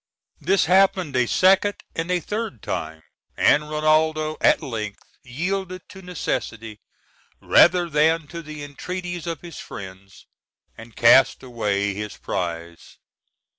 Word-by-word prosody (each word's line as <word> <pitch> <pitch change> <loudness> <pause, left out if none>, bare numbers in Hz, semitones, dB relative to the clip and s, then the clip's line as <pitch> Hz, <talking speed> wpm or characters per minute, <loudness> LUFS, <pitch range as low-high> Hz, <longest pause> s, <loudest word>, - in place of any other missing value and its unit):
This 195 0 +2
happened 185 -5 +3
a 125 -1 +2
second 195 - +3 0.2
and 165 +2 -3
a 180 -1 +1
third 205 - -5
time, 80 0 -5 0.3
and 150 +1 +3
Rinaldo 155 0 +1
at - - +4
length 110 -6 -5 0.2
yielded 185 +7 -4
to 190 -2 -12
necessity, 115 - -4 0.6
rather 175 0 +4
than 160 +1 +2
to 170 -1 -7
the 155 -2 -9
entreaties 175 +4 -6
of 165 -3 -4
his 175 -1 -10
friends, 95 -1 -11 0.5
and 115 0 -13
cast 130 +4 +5
away 100 -5 -1
his 105 +1 -6
prize. 85 -1 -5
155 Hz, 125 wpm, -23 LUFS, 110-180 Hz, 0.6 s, cast